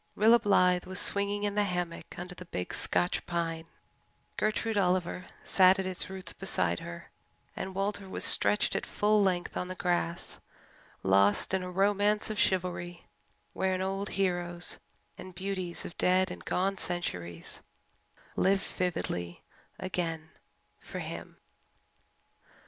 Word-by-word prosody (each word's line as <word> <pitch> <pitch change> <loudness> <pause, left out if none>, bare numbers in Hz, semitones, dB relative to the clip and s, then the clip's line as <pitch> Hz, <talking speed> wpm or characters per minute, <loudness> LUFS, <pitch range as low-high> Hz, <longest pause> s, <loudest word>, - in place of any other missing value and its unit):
Rilla 225 +3 +6
Blythe 180 -4 +3
was 185 +1 -2
swinging 200 0 +2
in 205 -1 0
the 210 0 +2
hammock 180 -3 -4
under 180 +1 -6
the 180 - -10
big 90 - -4
Scotch 90 0 +1
pine, 165 -1 -2 0.7
Gertrude 215 +1 0
Oliver 180 -2 +1 0.2
sat 185 0 +5
at 190 - -2
its 185 -1 -3
roots 190 -1 -4
beside 85 - 0
her, 85 0 -9 0.4
and 190 0 -5
Walter 195 0 -2
was - - 0
stretched 210 - +4
at - - 0
full 210 0 +3
length 180 -3 0
on 180 - -2
the 185 - -5
grass, 175 -2 -1 0.6
lost 100 - +3
in 190 - +2
a 180 - -5
romance 205 +3 +2
of 215 - -3
chivalry 175 -2 -1 0.5
wherein 185 0 0
old 195 +1 -2
heroes 175 -2 0 0.4
and 185 -1 -9
beauties 185 -2 -3
of 175 - -8
dead 185 0 +3
and - - -8
gone 190 +1 0
centuries 90 - -2 0.7
lived 195 +1 +3
vividly 90 - -3 0.3
again 165 -4 -3 0.5
for - - -8
him. - - -6
185 Hz, 135 wpm, -30 LUFS, 175-195 Hz, 0.7 s, Rilla